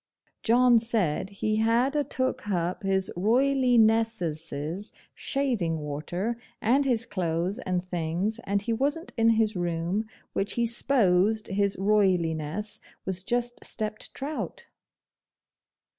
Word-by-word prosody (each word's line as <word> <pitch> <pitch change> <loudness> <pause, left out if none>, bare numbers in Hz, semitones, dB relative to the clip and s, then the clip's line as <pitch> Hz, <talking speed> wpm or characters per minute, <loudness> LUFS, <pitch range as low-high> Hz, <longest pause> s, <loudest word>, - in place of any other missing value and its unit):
John 240 +1 +5
said 210 -7 0
he 215 +2 -1
had 235 +5 +2
a 295 - +2
took 260 -2 -2
hup 180 -3 -1
His 190 -1 0
Roilighnessesses 220 - +1 0.2
shaving 235 - 0
water, 160 +10 -3 0.2
and 265 +6 +3
his 235 -4 +1
clothes 180 +3 -1
and 180 -5 -2
things, 180 +5 -2
and 200 +1 0
he 230 - 0
wasn't 285 +8 -1
in 225 -2 +4
his 220 -2 +2
room, 175 +4 -1 0.3
which 195 - -1
he 235 - +1
sposed 220 -4 +2
His 200 0 +1
Royliness 190 -2 +1 0.3
was 185 -1 -2
just 240 +4 -2
stepped 215 -1 -3
trout. 290 +3 -5
210 Hz, 115 wpm, -27 LUFS, 180-235 Hz, 0.3 s, John